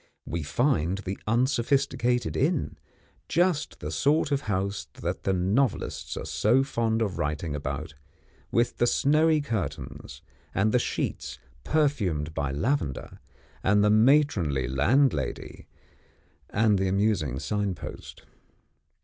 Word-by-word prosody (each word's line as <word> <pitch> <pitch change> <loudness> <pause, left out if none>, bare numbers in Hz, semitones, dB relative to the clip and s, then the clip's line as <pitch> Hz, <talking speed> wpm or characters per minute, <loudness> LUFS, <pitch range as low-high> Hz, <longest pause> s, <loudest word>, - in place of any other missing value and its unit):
We 85 +1 -3
find 90 - +1
the 95 -1 -5
unsophisticated 125 0 +1
inn 150 +2 0 0.5
just 175 -2 +1
the - - -4
sort 150 +1 +2
of 140 -1 +1
house 100 0 -2
that - - -5
the 95 - +2
novelists 100 +7 0
are - - -5
so 125 +6 +2
fond 115 -4 0
of 100 -4 -3
writing 75 +1 -2
about, 70 +1 -4 0.6
with 120 +1 +1
the 120 - +2
snowy 155 +4 +3
curtains, 115 -10 -5 0.3
and 105 +3 +2
the 125 - +3
sheets - - -3 0.3
perfumed 100 - 0
by 70 -3 -2
lavender, 75 - -2 0.4
and 105 +2 +4
the 105 - +4
matronly 110 - +3
landlady, 120 - 0 0.8
and 105 -2 +2
the 95 - +1
amusing 95 - +1
signpost. 95 +7 -4
105 Hz, 115 wpm, -27 LUFS, 85-135 Hz, 0.8 s, and